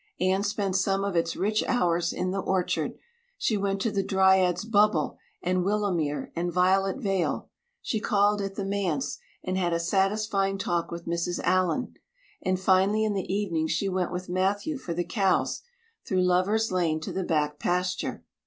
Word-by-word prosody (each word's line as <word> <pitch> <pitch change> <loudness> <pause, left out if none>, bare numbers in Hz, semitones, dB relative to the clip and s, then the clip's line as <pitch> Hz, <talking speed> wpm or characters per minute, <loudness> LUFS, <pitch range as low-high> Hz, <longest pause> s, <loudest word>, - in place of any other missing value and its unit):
Anne 185 +2 +2
spent 200 -2 -1
some 195 +1 +1
of 200 -2 -2
its 165 0 +1
rich 215 +3 +1
hours 175 -8 +1
in 185 0 -2
the 195 - -1
orchard; 185 -1 -1 0.4
she 245 - +1
went 195 -1 -1
to 220 +2 0
the 200 - +1
Dryad's 190 -1 +3
Bubble 210 -8 +2 0.2
and 180 0 +1
Willowmere 175 -9 -1
and 175 +1 -1
Violet 190 +3 +2
Vale; 195 -8 -1 0.4
she 220 - -1
called 205 0 +2
at 195 0 -4
the 200 - -3
manse 180 -8 -1 0.2
and 185 +1 -1
had 175 -2 +1
a 170 - +1
satisfying 195 +2 +1
talk 175 -3 -1
with 170 0 -7
Mrs. 170 +1 -2
Allan; 185 +7 +1 0.5
and 185 -1 0
finally 190 +3 +3
in 215 -1 +1
the 190 -2 -3
evening 175 -6 0
she 200 - 0
went 185 -2 -1
with 180 +1 -4
Matthew 200 - 0
for 170 -9 -5
the 175 0 -1
cows, 195 -4 +1 0.4
through 185 -2 +1
Lovers' 185 +5 +2
Lane 170 -4 +1
to - - -5
the 190 - -1
back 150 -3 0
pasture. 180 +1 -1
190 Hz, 170 wpm, -27 LUFS, 175-200 Hz, 0.5 s, Dryad's